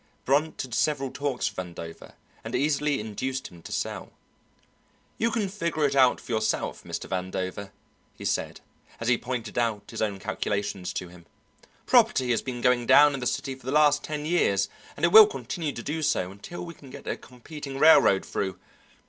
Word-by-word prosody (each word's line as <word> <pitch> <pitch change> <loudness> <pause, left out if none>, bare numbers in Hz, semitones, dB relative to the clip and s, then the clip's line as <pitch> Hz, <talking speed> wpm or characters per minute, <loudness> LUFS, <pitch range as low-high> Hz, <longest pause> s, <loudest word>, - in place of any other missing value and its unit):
Brunt 145 +4 +1
had 125 -3 -9
several 135 +3 0
talks 140 -5 -2
with 105 - -5
Vandover 85 -2 -8 0.3
and - - -4
easily 145 0 +1
induced 130 +5 -4
him 85 -1 -15
to - - -10
sell. - - -4 1.1
"You 230 - +2
can 225 -3 -1
figure 170 -6 -1
it 140 -1 0
out 130 -2 +5
for - - -10
yourself, 110 -1 -1
Mr. - - -5
Vandover," 95 +1 -4 0.5
he - - -9
said, - - -2 0.4
as 115 - -1
he 120 - +4
pointed 120 -2 -3
out 115 -3 -2
his - - -5
own 105 -3 0
calculations 100 -2 -3
to 90 - -5
him; 85 -1 -16 0.6
"property 125 -1 +4
has 115 - +1
been 125 -2 -5
going 125 -1 +2
down 145 0 +7
in 135 - -3
the 125 - -2
city 135 - -2
for 130 -1 -13
the - - -1
last 145 -1 +4
ten 150 -1 -4
years, 155 - +2 0.3
and - - +2
it 170 - +2
will 215 +1 +11
continue 145 - -4
to 115 - -7
do 160 +2 -3
so 95 -11 0
until 100 - -8
we 170 - -8
can 140 -4 -15
get - - -11
a - - -1
competing 135 +2 -9
railroad 135 -10 +6
through. 95 -2 -3
130 Hz, 190 wpm, -26 LUFS, 105-150 Hz, 1.1 s, will